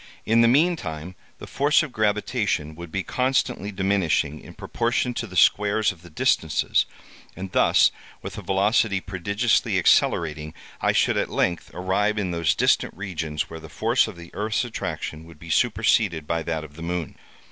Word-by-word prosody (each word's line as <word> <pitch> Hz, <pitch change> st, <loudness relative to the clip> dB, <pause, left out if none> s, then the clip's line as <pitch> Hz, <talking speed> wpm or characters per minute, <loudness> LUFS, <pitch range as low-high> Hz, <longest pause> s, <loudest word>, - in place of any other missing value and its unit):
In 115 Hz, +1 st, +4 dB
the 115 Hz, -, +5 dB
meantime, 115 Hz, -, +1 dB, 0.2 s
the -, -, -9 dB
force 145 Hz, +3 st, +2 dB
of 150 Hz, -, -6 dB
gravitation 105 Hz, -, -1 dB
would 85 Hz, +1 st, -10 dB
be 95 Hz, +2 st, -2 dB
constantly 125 Hz, -5 st, -1 dB
diminishing, 95 Hz, -6 st, 0 dB
in -, -, -13 dB
proportion 120 Hz, +1 st, -1 dB
to -, -, -4 dB
the 95 Hz, -, -11 dB
squares 105 Hz, +4 st, +3 dB
of 85 Hz, -3 st, -15 dB
the 85 Hz, -, -14 dB
distances, 80 Hz, -1 st, +1 dB, 0.5 s
and 95 Hz, 0 st, -7 dB
thus, -, -, +4 dB, 0.3 s
with -, -, -6 dB
a -, -, -6 dB
velocity 100 Hz, +1 st, +2 dB
prodigiously 100 Hz, +5 st, 0 dB
accelerating, 75 Hz, -1 st, +2 dB, 0.3 s
I -, -, +3 dB
should -, -, +2 dB
at -, -, 0 dB
length 85 Hz, -1 st, -1 dB
arrive 100 Hz, +4 st, 0 dB
in 95 Hz, -4 st, -1 dB
those 85 Hz, -3 st, +1 dB
distant -, -, +1 dB
regions 80 Hz, -6 st, -3 dB
where 80 Hz, -, -9 dB
the 80 Hz, -, -12 dB
force 115 Hz, +2 st, +1 dB
of 110 Hz, -, -8 dB
the 85 Hz, 0 st, -12 dB
earth's 110 Hz, +4 st, -1 dB
attraction 80 Hz, -8 st, -5 dB
would 85 Hz, -2 st, -14 dB
be 80 Hz, +1 st, -9 dB
superseded 105 Hz, -8 st, +2 dB
by 85 Hz, +2 st, -1 dB
that 80 Hz, -1 st, -3 dB
of 75 Hz, 0 st, -12 dB
the -, -, -9 dB
moon. 85 Hz, -2 st, -4 dB
95 Hz, 170 wpm, -24 LUFS, 80-110 Hz, 0.5 s, the